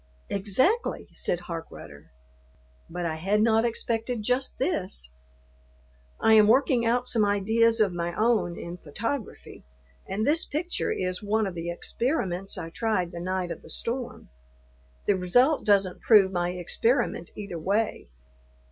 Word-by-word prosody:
"Exactly," 255 - 0
said 175 - -1
Harkrudder, 165 - -9 0.8
"but 175 +1 -4
I 160 -1 -2
had 195 +6 +1
not 225 0 +3
expected 230 0 -2
just 250 +4 -1
this. 185 - -2 1.1
I 220 - +4
am 215 -1 +7
working 255 +1 +3
out 245 +2 +1
some 225 -3 +2
ideas 220 +3 +3
of 205 -4 +3
my 170 0 -3
own 215 -6 +1
in 170 +1 -7
photography, 225 - -5 0.4
and 205 +3 -2
this 320 +3 +3
picture 330 +5 -2
is 185 0 -2
one 215 +1 +1
of 190 - -4
the 170 0 -5
experiments 195 - -2
I 165 - -6
tried 185 -4 -1
the 170 - -7
night 185 0 -2
of 165 - -6
the - - -14
storm. 245 +8 -3 0.8
The 205 - +4
result 245 - +2
doesn't 195 -3 +2
prove 205 -4 +5
my 175 -1 0
experiment 180 - 0
either 200 -5 -6
way. 200 - -1
205 Hz, 140 wpm, -26 LUFS, 175-230 Hz, 1.1 s, am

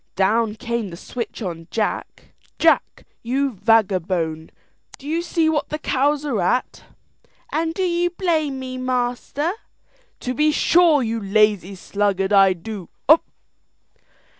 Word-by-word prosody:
Down 210 +3 +2
came 235 -2 -3
the 170 - -9
switch 235 +3 -6
on 165 -3 -6
Jack. 215 -2 -3 0.2
"Jack, 330 -1 +2 0.2
you 270 +4 0
vagabone, 185 -7 +1 0.5
do 275 - -12
you 325 +3 0
see 335 -2 0
what 310 -2 0
the 305 - -2
cows 290 0 0
are 240 -9 -1
at?" 250 +8 -1 0.7
"And 325 +1 -1
do 380 - -1
you 350 -1 +1
blame, 290 -8 -2
master?" 255 +5 -1 0.7
"To 250 - -2
be 300 +4 +2
sure, 320 -2 +4
you 225 0 -2
lazy 200 -2 +2
sluggard, 200 +1 -1
I 195 -1 +6
do?" 185 +1 -8
240 Hz, 125 wpm, -21 LUFS, 200-300 Hz, 0.7 s, I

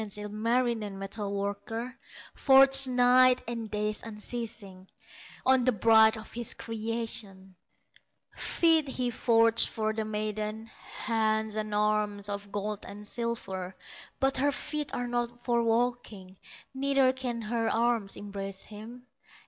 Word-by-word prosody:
Ilmarinen, 215 +1 -1
metal 200 +1 -5
worker, 200 +5 -4 0.4
Forges 270 0 +6
nights 250 0 +4
and 230 -2 -5
days 210 0 -2
unceasing, 210 -4 -5 0.6
On 260 -1 +4
the 255 - +3
bride 220 +1 +5
of 220 - -11
his 235 -1 -1
creation; 220 -4 -5 0.8
Feet 325 -3 +2
he 250 -2 -2
forges 230 -1 +3
for 220 -1 -2
the 220 0 -2
maiden, 215 0 -3 0.4
Hands 220 -1 0
and 215 -1 -3
arms, 210 -1 0
of 200 0 -5
gold 210 0 -4
and 205 +1 -9
silver; 195 -6 -4 0.4
But 270 0 +2
her 285 +2 +2
feet 300 +1 -4
are 245 - -3
not 240 0 -3
for 235 -1 +1
walking, 230 -5 -2 0.4
Neither 270 -1 +2
can 250 -3 -4
her 225 +1 -1
arms 230 -3 0
embrace 195 -1 -6
him. 225 +4 -11
225 Hz, 125 wpm, -29 LUFS, 210-245 Hz, 0.8 s, Forges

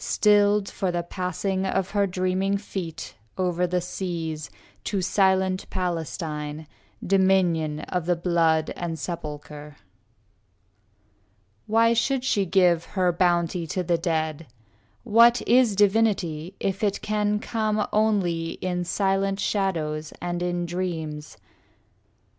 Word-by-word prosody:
Stilled 205 -1 +3
for 190 - -2
the 175 0 -2
passing 185 +2 -2
of 190 0 -1
her 200 -1 +2
dreaming 185 +2 0
feet 185 -5 -6 0.2
Over 180 -1 0
the 180 +1 0
seas, 165 -4 -4 0.4
to 200 - -1
silent 190 0 +1
Palestine, 160 -4 -4 0.4
Dominion 180 -5 +2
of 180 -2 -3
the 175 - +3
blood 165 -2 +1
and 170 -2 -4
sepulchre. 150 -3 -7
II - - -30 1.8
Why 230 +2 +4
should 250 +3 +1
she 200 -7 +1
give 175 -2 +3
her 180 -1 +3
bounty 175 -1 +1
to 185 +4 -2
the 170 -1 +1
dead? 160 -2 -2 0.6
What 235 +1 +5
is 240 -3 +4
divinity 195 -5 +1
if 195 +1 -2
it 200 -2 0
can 210 0 0
come 215 -1 -1
Only 185 -7 +1
in 180 -1 -3
silent 195 +1 0
shadows 160 -7 -1
and 175 0 -3
in 175 0 -1
dreams? 165 -4 -4
180 Hz, 120 wpm, -25 LUFS, 165-200 Hz, 1.8 s, What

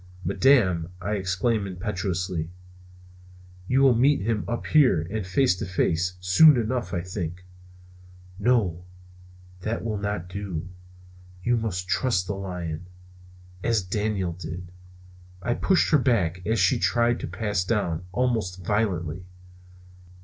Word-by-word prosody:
"Madam," 95 -6 +3
I 100 +3 -4
exclaimed 100 +2 0
impetuously, 90 -3 -3 1.2
"you 130 +4 +3
will 135 -2 +6
meet 135 +3 +3
him 110 +1 -1
up 120 - -3
here, 125 - +4
and 110 -1 -2
face 95 +2 +3
to - - -4
face, 90 -1 0
soon 125 - +6
enough, 120 +1 -1
I 90 - -1
think." 90 -1 -5 0.9
"No, 100 -7 +1 0.8
that 110 +5 -3
will 110 -3 -2
not 105 -4 -3
do. 90 -3 -5 0.8
You 120 +3 +2
must 95 -6 -2
trust 95 -2 +1
the 100 - -3
lion; 90 -4 -5 0.7
as 110 -1 +1
Daniel 100 -1 -1
did." 90 +1 -7 0.7
I 120 +5 -1
pushed 190 +8 +2
her 155 - +6
back, 95 -9 +1
as 110 +1 +1
she 95 +7 +3
tried 120 +1 +2
to - - -4
pass 105 -5 -1
down, 90 -5 -1
almost 105 -5 -1
violently. 90 -5 -1
100 Hz, 130 wpm, -25 LUFS, 90-115 Hz, 1.2 s, will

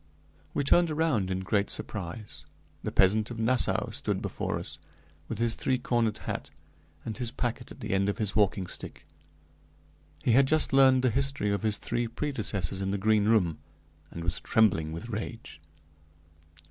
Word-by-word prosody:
We 145 - +1
turned 170 +4 +4
around 150 - +1
in 95 0 -1
great 100 +2 0
surprise; 100 +1 -5 0.3
the - - -3
peasant 105 +3 +3
of 120 - -6
Nassau 120 +3 +1
stood - - -2
before - - -3
us, - - -6 0.5
with - - -4
his 115 0 +2
three 130 +2 0
cornered 120 -3 0
hat, - - -4 0.6
and 110 - -4
his 125 -2 -3
packet 120 0 -3
at - - -12
the - - -4
end 100 +1 +2
of 100 - -2
his 105 -3 0
walking 100 -2 +2
stick. - - -7 1.2
He - - +3
had 135 +3 +5
just 155 -1 +1
learned 130 -1 +6
the 130 - +3
history 135 -4 +1
of 100 - -1
his 110 -1 +1
three 120 0 -2
predecessors 105 -8 -2
in 95 - -1
the 100 - 0
Green 105 +1 +3
Room, 100 -8 +2 0.5
and 85 - -7
was 85 -1 -1
trembling 90 -8 +2
with 85 +9 -7
rage. 110 -7 -6
110 Hz, 170 wpm, -29 LUFS, 100-125 Hz, 1.2 s, learned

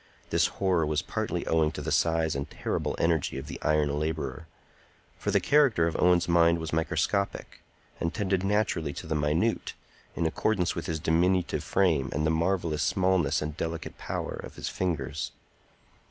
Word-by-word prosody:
This - - +3
horror 95 -4 +2
was 75 -1 0
partly - - -3
owing 80 -1 +2
to 75 - -5
the 80 - -3
size 80 +1 +2
and 70 0 -3
terrible - - -2
energy 80 -4 +1
of 65 - -5
the - - -8
iron 75 -1 +1
laborer; 75 -1 -3 0.7
for - - -2
the - - +4
character 140 - +4
of 85 - -1
Owen's 90 -1 +4
mind 85 -1 +4
was 80 -1 -5
microscopic, 90 +5 -1 0.4
and 85 - -1
tended 95 -2 0
naturally 95 -7 0
to - - -7
the 80 - -2
minute, 75 +9 0 0.4
in 85 - 0
accordance 90 +2 +1
with 85 - -5
his 80 -1 -2
diminutive 90 +4 +1
frame 80 -9 +2
and 75 - 0
the 80 - +3
marvellous 85 -2 0
smallness 90 -4 +2
and 75 0 -4
delicate 80 -1 -4
power - - -4
of - - -10
his - - -4
fingers. 80 -2 -2
80 Hz, 170 wpm, -28 LUFS, 75-90 Hz, 0.7 s, the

